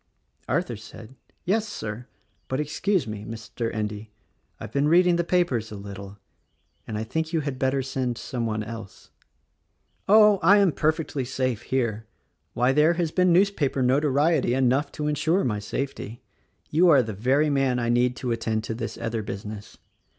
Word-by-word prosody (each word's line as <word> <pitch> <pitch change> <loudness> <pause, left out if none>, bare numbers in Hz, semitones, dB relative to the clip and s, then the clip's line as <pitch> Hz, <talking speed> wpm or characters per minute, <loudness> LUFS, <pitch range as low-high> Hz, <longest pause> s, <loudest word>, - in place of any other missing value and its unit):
Arthur - - -1
said, 115 +3 -12 0.3
"Yes, 215 +4 +1
Sir; 115 - -6 0.4
but, 130 - -2
excuse 160 +4 0
me, 105 -2 -6
Mr. 115 +1 -5
Endy, 105 0 -4 0.3
— - - -44
I've - - -8
been 140 +4 +1
reading 175 +2 +5
the 170 - +1
papers 165 -12 0
a - - -6
little, 100 0 -9 0.4
— - - -44
and 110 - -4
I 110 - -2
think 160 +8 -3
you 160 - +1
had 140 -3 -4
better 130 0 +1
send 130 -2 -2
some 120 -2 -3
one 110 -1 -2
else." 110 -2 -10 1.0
"Oh! 210 -1 +7
I 195 +5 +6
am 200 -4 +4
perfectly 155 -3 -1
saTe 130 -2 -2
here. 115 -4 -1 0.5
Why, 125 +2 +3
there 150 +4 +4
has 170 -2 -1
been 180 0 +3
newspaper 170 -8 +2
notoriety 140 +1 +2
enough 135 +2 +1
to 150 - -4
insure 160 +5 +1
my 105 -4 -1
safety. 120 0 -5 0.5
You 170 +4 +5
are 140 -5 +6
the 110 -1 -5
very 135 +9 +2
man 135 -3 +1
I 120 -1 -1
need 120 +1 +2
to 125 -2 -3
attend 110 -1 -1
to 115 - -4
this 115 - -5
other 115 -1 -3
business. 105 +1 -7
130 Hz, 170 wpm, -25 LUFS, 110-155 Hz, 1.0 s, Oh